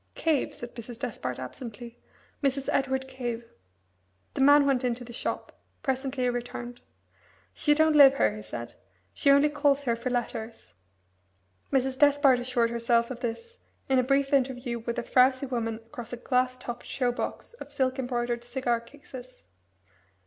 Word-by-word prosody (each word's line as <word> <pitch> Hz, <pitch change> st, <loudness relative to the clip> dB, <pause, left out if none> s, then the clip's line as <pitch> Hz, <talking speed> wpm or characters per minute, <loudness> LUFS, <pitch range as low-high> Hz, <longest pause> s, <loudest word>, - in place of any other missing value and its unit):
"Cave," 315 Hz, -5 st, 0 dB
said 240 Hz, 0 st, -9 dB
Mrs. 235 Hz, 0 st, -9 dB
Despard 200 Hz, -, -4 dB
absently; 230 Hz, -, -8 dB, 0.4 s
"Mrs. 275 Hz, -1 st, 0 dB
Edward 265 Hz, -1 st, 0 dB
Cave." 240 Hz, -3 st, -5 dB, 0.8 s
The -, -, -2 dB
man 285 Hz, +1 st, +7 dB
went 270 Hz, -3 st, +2 dB
into 245 Hz, 0 st, -1 dB
the 240 Hz, 0 st, -10 dB
shop. -, -, -4 dB, 0.2 s
Presently 265 Hz, -1 st, -1 dB
he 250 Hz, -, +2 dB
returned. 245 Hz, 0 st, -6 dB, 0.7 s
"She 295 Hz, -1 st, +2 dB
don't 315 Hz, 0 st, +4 dB
live 275 Hz, -2 st, +8 dB
here," 105 Hz, -1 st, +2 dB
he 105 Hz, -, -7 dB
said; 110 Hz, +2 st, -7 dB, 0.4 s
"she -, -, +1 dB
only 280 Hz, +1 st, +6 dB
calls 285 Hz, -1 st, +2 dB
here 235 Hz, -3 st, +1 dB
for 235 Hz, +2 st, -4 dB
letters." 225 Hz, -, -4 dB, 1.0 s
Mrs. 265 Hz, -1 st, 0 dB
Despard 285 Hz, -3 st, +5 dB
assured 245 Hz, -2 st, 0 dB
herself 235 Hz, 0 st, +1 dB
of 245 Hz, -, -6 dB
this 465 Hz, -, -5 dB, 0.3 s
in 265 Hz, -1 st, +4 dB
a -, -, +3 dB
brief 275 Hz, +2 st, +1 dB
interview 250 Hz, -3 st, 0 dB
with 235 Hz, +1 st, -4 dB
a 240 Hz, -, -1 dB
frowsy 260 Hz, +2 st, +3 dB
woman 230 Hz, -4 st, -2 dB
across 230 Hz, +1 st, -10 dB
a 245 Hz, -, -4 dB
glass 255 Hz, +1 st, 0 dB
topped 240 Hz, -1 st, -7 dB
show 250 Hz, -2 st, 0 dB
box 245 Hz, -, -5 dB
of 285 Hz, -, -9 dB
silk 265 Hz, -1 st, 0 dB
embroidered 240 Hz, -2 st, -2 dB
cigar 240 Hz, -1 st, -1 dB
cases. 255 Hz, 0 st, -13 dB
250 Hz, 160 wpm, -28 LUFS, 235-275 Hz, 1.0 s, live